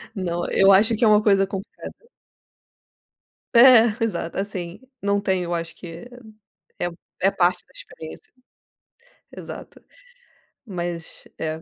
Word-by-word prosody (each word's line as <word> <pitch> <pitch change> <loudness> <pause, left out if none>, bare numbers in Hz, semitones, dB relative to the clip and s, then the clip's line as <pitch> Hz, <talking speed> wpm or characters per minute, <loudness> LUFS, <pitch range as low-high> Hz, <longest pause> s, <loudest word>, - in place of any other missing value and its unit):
Não, 175 -3 -3
eu 195 0 +5
acho 210 +4 +5
que 225 - -2
é - - +6
uma 210 0 +5
coisa 195 -2 +4
concreta. 195 - -9 1.5
É. 235 -1 +8 0.2
Exato, 205 -6 -4
assim, 185 -3 -5 0.2
não 200 0 +1
tenho 190 -2 0
eu 175 0 -3
acho 165 0 -5
que 170 +6 -10 0.7
é - - -1 0.3
é 195 - +3
parte 180 0 +1
da - - -26
experiência. 160 0 -12 1.0
Exato, - - -10 0.8
mas 175 -5 -6
é 160 0 -3
190 Hz, 125 wpm, -23 LUFS, 175-205 Hz, 1.5 s, É